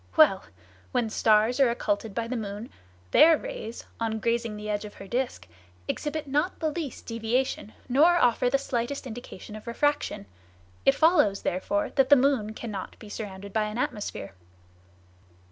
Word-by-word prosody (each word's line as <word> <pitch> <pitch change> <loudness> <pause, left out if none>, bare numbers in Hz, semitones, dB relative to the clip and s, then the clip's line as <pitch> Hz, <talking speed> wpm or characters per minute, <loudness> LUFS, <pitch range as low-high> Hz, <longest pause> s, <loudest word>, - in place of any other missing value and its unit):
Well! 285 -12 +6 0.5
When 240 -3 0
stars 220 +4 +3
are 270 -3 +5
occulted 210 -3 -2
by 230 -1 -1
the 255 - -3
moon, 210 0 -5 0.4
their 320 - +7
rays, - - -7
on 225 -1 -1
grazing 230 0 -1
the 210 0 -7
edge 210 0 -1
of 210 - -9
her 195 - -10
disc, 245 - -2 0.4
exhibit 300 +1 -3
not 295 +7 0
the 315 -2 0
least 300 -4 -5
deviation, 230 0 -1
nor 300 +7 +5
offer 250 -5 +3
the 275 - +3
slightest 270 0 -3
indication 225 -3 -8
of 215 +2 -11
refraction. 290 - 0 0.6
It 275 - +6
follows, 295 - +4
therefore, 205 +3 -1
that 265 -1 +2
the 285 - +9
moon 250 -6 +1
cannot 210 -5 -6
be 215 - -12
surrounded 200 -2 -7
by 220 -1 +1
an 210 +1 -5
atmosphere. 210 - -3
235 Hz, 160 wpm, -27 LUFS, 210-275 Hz, 0.6 s, the